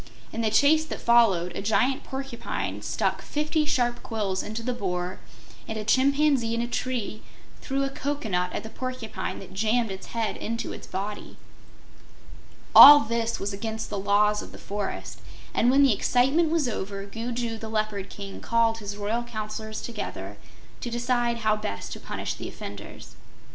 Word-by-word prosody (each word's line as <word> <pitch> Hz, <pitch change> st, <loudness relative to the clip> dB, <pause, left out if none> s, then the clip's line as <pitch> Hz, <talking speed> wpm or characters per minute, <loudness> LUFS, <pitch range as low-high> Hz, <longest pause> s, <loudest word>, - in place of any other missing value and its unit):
In 230 Hz, -, -2 dB
the 220 Hz, -, +2 dB
chase 285 Hz, +8 st, +5 dB
that -, -, -6 dB
followed 195 Hz, -8 st, +4 dB
a -, -, -3 dB
giant 250 Hz, +6 st, +1 dB
porcupine 235 Hz, -, -4 dB
stuck 190 Hz, -, -1 dB
fifty 305 Hz, +1 st, 0 dB
sharp 245 Hz, -5 st, +1 dB
quills 205 Hz, -5 st, -2 dB
into 220 Hz, +2 st, -5 dB
the 250 Hz, -, -1 dB
Boar 180 Hz, -4 st, -3 dB, 0.5 s
and 220 Hz, -, -4 dB
a 215 Hz, -, -3 dB
chimpanzee 270 Hz, -1 st, +3 dB
in 230 Hz, -, 0 dB
a -, -, -2 dB
tree 240 Hz, -3 st, -3 dB, 0.4 s
threw 275 Hz, +1 st, -1 dB
a 275 Hz, -, 0 dB
cocoanut 220 Hz, -12 st, -2 dB
at -, -, -4 dB
the 220 Hz, -, -8 dB
porcupine 255 Hz, -3 st, -5 dB
that 190 Hz, -, -10 dB
jammed 220 Hz, +2 st, +1 dB
its 190 Hz, 0 st, -7 dB
head 225 Hz, -2 st, -2 dB
into 230 Hz, +1 st, -4 dB
its -, -, -9 dB
body. 205 Hz, +2 st, -5 dB, 1.4 s
All 290 Hz, 0 st, +12 dB
this 230 Hz, 0 st, -1 dB
was 200 Hz, +1 st, -3 dB
against 220 Hz, +2 st, -4 dB
the 205 Hz, -, -2 dB
Laws 210 Hz, +1 st, +3 dB
of -, -, -10 dB
the -, -, -11 dB
Forest, 200 Hz, 0 st, -5 dB, 0.3 s
and 240 Hz, -, +3 dB
when 275 Hz, +2 st, +5 dB
the 270 Hz, -5 st, +5 dB
excitement 270 Hz, +10 st, +2 dB
was 320 Hz, -4 st, +1 dB
over, 200 Hz, -3 st, -4 dB
Gugu 230 Hz, +2 st, -4 dB
the 220 Hz, -, -6 dB
Leopard 215 Hz, -3 st, -2 dB
King 200 Hz, -1 st, -8 dB
called 230 Hz, -1 st, +2 dB
his 205 Hz, -1 st, -6 dB
royal 210 Hz, +3 st, -1 dB
Counselors 215 Hz, -2 st, -5 dB
together 230 Hz, -3 st, -6 dB, 0.4 s
to 240 Hz, -, -4 dB
decide 240 Hz, 0 st, 0 dB
how 215 Hz, -1 st, +3 dB
best 215 Hz, 0 st, -5 dB
to -, -, -8 dB
punish -, -, -4 dB
the -, -, -7 dB
offenders. -, -, -9 dB
225 Hz, 170 wpm, -26 LUFS, 205-245 Hz, 1.4 s, All